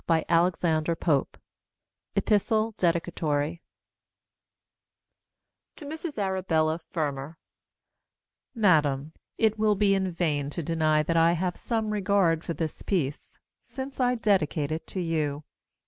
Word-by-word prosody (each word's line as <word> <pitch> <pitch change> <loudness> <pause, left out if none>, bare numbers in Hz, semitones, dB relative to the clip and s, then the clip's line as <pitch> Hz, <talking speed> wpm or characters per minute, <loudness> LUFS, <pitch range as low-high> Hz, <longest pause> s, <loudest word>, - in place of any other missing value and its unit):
] - - -21 2.1
Epistle 220 +1 +2
Dedicatory 165 -2 0 2.1
To 300 - -10
Mrs 315 0 -6
Arabella 180 -5 0
Fermor 155 -3 -4 1.2
Madam, 155 - +2 0.2
It 220 -1 +2
will 215 -1 +3
be 200 0 +3
in 190 -1 0
vain 150 -5 -1
to 165 +3 -5
deny 155 -1 +2
that 165 +2 0
I 165 +1 +5
have 175 +1 -1
some 220 -2 -2
regard 195 -5 +2
for 170 - -4
this 160 -2 -4
piece, 150 -8 -3 0.2
since 265 0 -7
I 250 -1 +2
dedicate 175 -9 +1
it 160 +1 -4
to 190 - -5
you. 155 -4 -1
170 Hz, 110 wpm, -27 LUFS, 155-205 Hz, 2.1 s, I